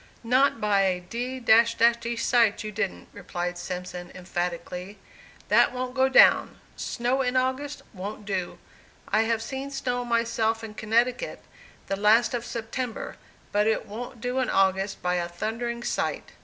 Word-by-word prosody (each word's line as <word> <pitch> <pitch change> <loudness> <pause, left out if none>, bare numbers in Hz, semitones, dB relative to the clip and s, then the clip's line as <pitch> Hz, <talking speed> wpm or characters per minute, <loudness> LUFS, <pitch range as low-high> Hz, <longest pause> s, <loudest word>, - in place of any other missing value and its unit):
"Not 255 +2 +3
by 205 -2 +3
a 185 -2 +1
d 240 +8 -5
d 230 0 +4
sight, 230 -3 +2
you 215 - -5
didn't," 200 -2 -3
replied 175 -2 -4
Simpson, 180 0 -6
emphatically. 180 +2 -4 0.5
"That - - +5
wont 250 0 -3
go 265 0 +3
down. 265 - +5 0.2
Snow 250 +3 -1
in 255 0 0
August 260 +3 -1
wont 205 +2 -7
do. 190 -3 -3 0.5
I 215 - +3
have 225 0 0
seen 265 +3 -5
snow 250 -3 -2
myself 230 -1 0
in 220 -1 -7
Connecticut, 235 - 0 0.4
the 195 - -2
last 220 +5 +4
of 240 -1 -2
September, 230 +1 -4 0.3
but 210 +1 +2
it 220 - +1
wont 235 +3 -8
do 250 +2 -1
in 255 - 0
August, 195 +1 +1
by 180 0 +1
a 175 -1 -2
thundering 235 +6 -3
sight." - - -2
225 Hz, 150 wpm, -26 LUFS, 195-245 Hz, 0.5 s, That